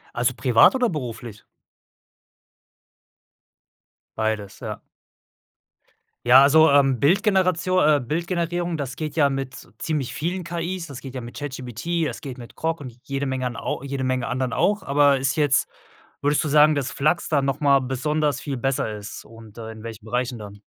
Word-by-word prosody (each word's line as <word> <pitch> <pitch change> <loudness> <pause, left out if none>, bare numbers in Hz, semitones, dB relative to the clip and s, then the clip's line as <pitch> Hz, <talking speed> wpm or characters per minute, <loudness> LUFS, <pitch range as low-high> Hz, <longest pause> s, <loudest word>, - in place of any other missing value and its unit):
Also, 120 +2 +1
privat 120 - +5
oder 250 -2 +2
beruflich? 120 - -6 2.7
Beides, 110 -2 -2
ja. - - -6 1.4
Ja, 125 +2 +8
also, 155 +3 +6
ähm, 135 -4 +3
Bildgeneratio 185 +1 +2
äh, 150 -1 +4
Bildgenerierung, 170 +4 -2
das 135 -3 -4
geht 155 +1 -5
ja 145 -3 +4
mit 135 -1 -5
ziemlich 150 -6 -2
vielen 175 +3 -3
KIs. 170 +1 -4
Das 140 -3 -9
geht 135 -1 -9
ja - - -3
mit 120 0 -10
ChatGPT, 145 +4 -3
es - - -6
geht 135 -3 -7
mit 120 -4 -11
Grok 165 +1 -2
und 125 -5 -9
jede 140 0 -3
Menge 130 -1 -2
an 120 -2 -3
au - - -4
jede 135 -1 -3
Menge 130 -2 -1
anderen 130 -2 -2
auch. 210 -1 +1
Aber 140 0 +4
ist 135 0 0
jetzt 145 -3 +2 0.5
würdest 145 +1 +2
du 155 - -2
sagen, 150 +1 +6
dass 140 -2 -2
Flux 155 +5 0
da 145 -3 +2
noch 135 0 -2
mal 140 -2 +5
besonders 145 +3 -1
viel 140 -3 -4
besser 135 -3 -1
ist 105 0 -9
und, 115 -1 -15
äh, 110 -1 -7
in 110 -1 -11
welchen 115 -1 -8
Bereichen 125 +2 -2
dann? 105 -2 -10
140 Hz, 170 wpm, -23 LUFS, 125-155 Hz, 2.7 s, Ja